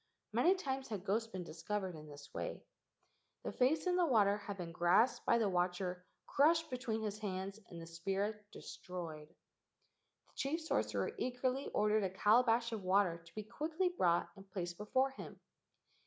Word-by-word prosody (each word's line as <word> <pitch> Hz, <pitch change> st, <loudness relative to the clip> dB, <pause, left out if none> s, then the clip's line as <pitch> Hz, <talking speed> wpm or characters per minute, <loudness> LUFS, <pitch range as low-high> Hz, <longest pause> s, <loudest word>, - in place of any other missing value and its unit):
Many 365 Hz, +3 st, +5 dB
times 270 Hz, -8 st, -3 dB
had 205 Hz, -4 st, -5 dB
ghosts 220 Hz, +3 st, +1 dB
been 185 Hz, -4 st, -5 dB
discovered 190 Hz, +3 st, -3 dB
in 155 Hz, 0 st, -10 dB
this 145 Hz, 0 st, -12 dB
way. -, -, -4 dB, 0.8 s
The -, -, -3 dB
face 270 Hz, +7 st, +2 dB
in 360 Hz, 0 st, +2 dB
the 355 Hz, -, +4 dB
water 205 Hz, -6 st, +4 dB
had 205 Hz, -1 st, -6 dB
been 175 Hz, -2 st, -5 dB
grasped 175 Hz, +9 st, +3 dB
by -, -, +5 dB
the 225 Hz, -3 st, +2 dB
watcher, 180 Hz, 0 st, -1 dB, 0.2 s
crushed 320 Hz, +2 st, +3 dB
between 240 Hz, -4 st, -2 dB
his 210 Hz, -1 st, -3 dB
hands, 195 Hz, 0 st, -4 dB
and 170 Hz, -, -8 dB
the 165 Hz, -, -7 dB
spirit 195 Hz, +5 st, -2 dB
destroyed. 165 Hz, -4 st, -7 dB
The -, -, -37 dB
chief 300 Hz, +5 st, -1 dB
sorcerer 320 Hz, -, 0 dB
eagerly 255 Hz, +2 st, -1 dB
ordered 210 Hz, 0 st, +2 dB
a 190 Hz, -, +1 dB
calabash 230 Hz, +4 st, +3 dB
of 220 Hz, -2 st, -3 dB
water 185 Hz, -2 st, +2 dB
to 165 Hz, -, -18 dB
be 215 Hz, -, -4 dB
quickly 320 Hz, -, -1 dB
brought 175 Hz, -, +2 dB
and 195 Hz, -1 st, -14 dB
placed 175 Hz, -2 st, -4 dB
before 260 Hz, +6 st, +1 dB
him. 270 Hz, -, -9 dB
210 Hz, 170 wpm, -36 LUFS, 180-255 Hz, 0.8 s, Many